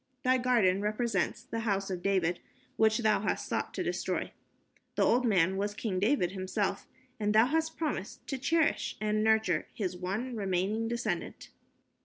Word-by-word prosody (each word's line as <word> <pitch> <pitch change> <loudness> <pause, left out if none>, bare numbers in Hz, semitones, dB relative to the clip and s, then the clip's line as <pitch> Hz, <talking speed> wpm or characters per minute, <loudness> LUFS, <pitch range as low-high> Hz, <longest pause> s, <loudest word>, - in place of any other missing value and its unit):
Thy 255 0 +3
garden 225 -7 +3
represents 210 -2 -1
the 230 - -4
House 195 -3 -1
of 180 -1 -3
David 180 -3 +1 0.4
which 220 -1 +3
thou 220 -3 +2
hast 210 - -1
sought - - -2
to - - -1
destroy. - - -2 0.6
The - - +2
old 250 +1 +3
man 190 -2 +3
was 205 +1 -2
King 205 -4 -2
David 205 -4 +2
himself, 190 +1 -2 0.3
and 210 0 0
thou 220 +2 +7
hast 320 +4 -1
promised 295 - -3
to 270 - -4
cherish 320 +4 +1
and 215 0 0
nurture 220 -7 +2
his 185 -4 -2
one 200 +8 -3
remaining 200 +2 0
descendant." 225 -6 -3
210 Hz, 160 wpm, -30 LUFS, 190-235 Hz, 0.6 s, thou